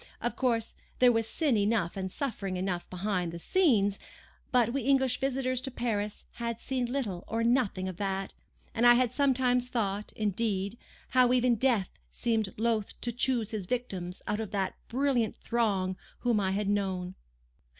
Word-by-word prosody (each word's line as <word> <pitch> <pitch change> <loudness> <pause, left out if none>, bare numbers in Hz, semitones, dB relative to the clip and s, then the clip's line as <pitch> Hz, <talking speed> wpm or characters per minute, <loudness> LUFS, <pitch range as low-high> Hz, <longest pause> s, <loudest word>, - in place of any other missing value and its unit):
Of 240 - -2
course, 230 -3 0 0.2
there 250 -1 +6
was 225 -1 0
sin 295 -7 +1
enough 205 -4 +1
and 190 -1 -3
suffering 200 -9 -3
enough 180 -1 -2
behind 180 -2 -1
the 170 - -6
scenes; 205 - +2 0.5
but 240 -3 +3
we 275 - 0
English 265 -1 +2
visitors 255 -1 0
to 265 - -4
Paris 215 -5 -2
had 235 -1 -4
seen 250 -2 -2
little 215 -10 -2
or 225 +1 -1
nothing 230 -6 +1
of 185 -2 -5
that,—and 195 +4 -2
I 240 - +9
had 245 -2 +2
sometimes 250 -3 +2
thought, 210 -4 -2
indeed, 205 -1 -1 0.3
how 250 -1 +4
even 250 -1 +4
death 230 -5 +2 0.2
seemed 225 -4 -1
loth 220 -2 0
to 240 - -1
choose 240 -2 0
his 205 -5 -4
victims 190 -7 -3
out 210 +1 -1
of 220 -3 -3
that 195 -2 -1
brilliant 250 -4 +1
throng 195 -6 0 0.2
whom 240 -3 +2
I 190 -2 +1
had 200 +1 -1
known. 190 -3 -1
225 Hz, 160 wpm, -30 LUFS, 195-250 Hz, 0.5 s, I